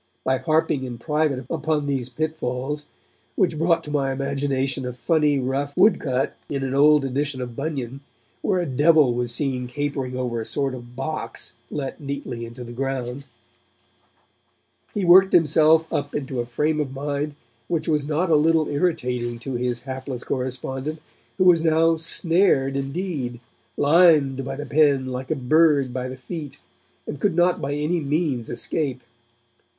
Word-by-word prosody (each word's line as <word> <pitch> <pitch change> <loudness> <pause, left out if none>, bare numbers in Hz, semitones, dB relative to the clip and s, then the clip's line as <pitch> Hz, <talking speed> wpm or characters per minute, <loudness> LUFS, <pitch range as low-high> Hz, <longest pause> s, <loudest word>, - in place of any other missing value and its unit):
By 130 0 +1
harping 155 +1 +1
in 125 -2 -5
private 150 -1 -1
upon 155 -1 -1
these 135 -3 -2
'pitfalls' 150 0 -3 0.5
which 170 -6 +1
brought 165 0 +2
to 150 - -7
my 140 -2 0
imagination 135 0 -1
a 125 0 -4
funny 150 +3 +2
rough 135 +2 -2
woodcut 135 -11 +2
in 140 -1 -2
an 135 -1 -2
old 145 +1 +5
edition 135 +1 -2
of 120 -2 -5
Bunyan, 140 -3 -4 0.4
where 190 -3 +1
a 175 - 0
devil 145 -1 +4
was 120 0 -1
seen 125 0 -1
capering 135 -1 -3
over 120 -2 -2
a - - -3
sort 135 +1 -1
of 120 -1 -10
box 135 -3 -4 0.2
let 140 +1 -5
neatly 140 -4 -5
into 120 +2 -9
the 120 - -9
ground 135 +1 -3 1.7
he 200 -3 -2
worked 190 +2 +7
himself 160 -1 +5
up 145 0 -2
into 135 -3 -3
a 120 - -2
frame 150 +6 0
of 135 -3 -2
mind 145 +1 -3 0.3
which 160 -3 -2
was 150 -3 +1
not 165 +3 0
a - - +6
little 160 +1 +3
irritating 125 -7 -1
to 130 +3 -6
his 120 -1 -1
hapless 130 -1 -5
correspondent, 130 +3 -3 0.4
who - - +3
was 175 -3 +5
now 165 0 +4
'snared' 165 -4 +2
indeed, 140 -3 -3 0.4
limed 145 -3 +4
by 135 +1 -4
the 145 +2 -6
pen 145 -4 +3
like 130 +1 -5
a 155 - +1
bird 145 -1 +3
by 130 0 -3
the 130 0 -7
feet, 145 +2 -7 0.5
and 145 - -6
could 185 +1 +1
not 175 +1 +2
by 140 +1 -2
any 150 +4 0
means 145 -5 -1
escape. 130 +1 -2
140 Hz, 160 wpm, -23 LUFS, 130-155 Hz, 1.7 s, worked